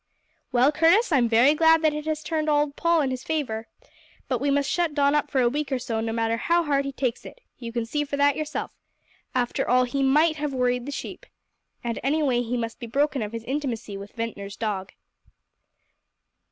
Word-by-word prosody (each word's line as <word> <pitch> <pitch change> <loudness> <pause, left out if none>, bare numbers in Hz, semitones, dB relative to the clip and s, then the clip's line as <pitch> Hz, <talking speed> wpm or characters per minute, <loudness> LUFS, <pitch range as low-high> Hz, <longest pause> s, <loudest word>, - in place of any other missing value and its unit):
"Well, 255 +3 +4
Curtis, 340 +8 +4
I'm 250 -6 +3
very 240 +6 +5
glad 320 +1 +4
that 310 -1 +3
it 300 +1 -5
has 310 -1 -2
turned 310 -2 -1
old 295 -1 +1
Paul 335 -1 +2
in 270 -2 0
his 255 0 -4
favour. 240 -8 -3 0.6
But - - -1
we 285 - +1
must 280 0 +1
shut 340 -4 0
Don 285 -1 +3
up 295 - +1
for 265 - +1
a 245 - +4
week 290 +4 -2
or 265 - +1
so, 240 -3 -3
no 225 0 -2
matter 225 0 0
how 340 +8 +2
hard 280 -3 +1
he 275 - -3
takes 255 -3 -2
it. - - -11 0.2
You 235 -2 -6
can 235 -1 -2
see 295 +6 -1
that 285 0 +2
for - - -10
yourself. 310 0 -4 0.6
After 245 -1 0
all, 255 +1 +5
he 250 +3 -2
might 305 +4 +3
have 295 -2 -3
worried 250 0 0
the - - -4
sheep. - - -7 0.6
And, 235 -1 -3
anyway, 275 -2 +1
he 245 +1 -2
must 230 -1 -4
be 235 - -6
broken 280 +2 0
of 210 -1 -4
his 230 -1 -6
intimacy 250 -6 -3
with 200 +1 -9
Ventnor's 210 -4 -5
dog." 200 -4 -3
275 Hz, 210 wpm, -25 LUFS, 235-300 Hz, 0.6 s, very